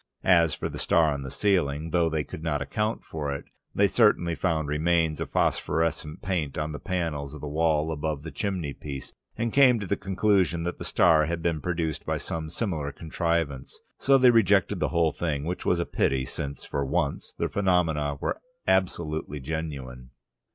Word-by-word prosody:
As 85 -5 +5
for - - -3
the - - -6
star 80 -3 +3
on 70 - -4
the 65 - -6
ceiling, 80 -2 0
though 85 -1 +3
they 80 -1 -1
could 75 - -9
not 80 -3 -1
account 105 +10 -2
for 75 -3 -4
it, 70 - -5 0.3
they 100 - +5
certainly 100 -6 +3
found 80 -3 0
remains 80 +1 +1
of - - -3
phosphorescent 80 -1 0
paint 85 -6 -2
on 75 0 -2
the 75 - -6
panels 75 -6 -3
of 75 - -10
the 75 - -5
wall 80 +1 +1
above 75 -1 -3
the 80 - -6
chimney 90 -8 -2
piece, 70 -2 -7 0.2
and 115 0 -1
came 130 -4 +6
to 100 - -4
the 100 - 0
conclusion 95 -4 +1
that 90 +1 -4
the - - -5
star 80 -3 +4
had 85 0 -3
been 85 -3 0
produced 85 -3 -2
by - - -1
some 80 -1 -4
similar 80 -6 -2
contrivance. 80 -3 -2 0.2
So 135 0 +5
they 130 -2 +6
rejected 100 -4 +3
the - - +1
whole 85 -2 +2
thing, 75 -4 -2
which 90 +4 -4
was 90 - +3
a 85 - -1
pity, 65 -1 0
since, 70 +1 -5
for 70 - -2
once, 70 - -1
the - - 0
phenomena 80 -7 +1
were - - -2 0.3
absolutely 80 -5 0
genuine. 65 -4 -5
80 Hz, 185 wpm, -27 LUFS, 75-90 Hz, 0.3 s, came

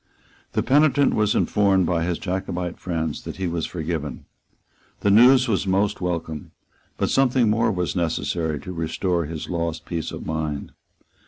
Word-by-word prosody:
The - - +1
penitent 145 0 +4
was 105 -1 +2
informed 100 -3 +3
by 85 -1 0
his 85 0 -1
Jacobite 90 -3 -3
friends 80 -4 -3
that - - -6
he 95 - -3
was 85 -2 -2
forgiven. 80 -3 -4 0.8
The 100 - +3
news 125 +5 +7
was 100 -3 0
most 95 +2 +1
welcome; 85 -4 -4 0.4
but - - 0
something 125 -4 +3
more 110 +1 +2
was 90 -5 -2
necessary 80 -2 -1
to 90 - -7
restore 85 +1 -1
his 80 0 -6
lost 85 -2 -3
peace 85 -3 -3
of - - -7
mind. 80 -2 -3
90 Hz, 155 wpm, -23 LUFS, 80-100 Hz, 0.8 s, news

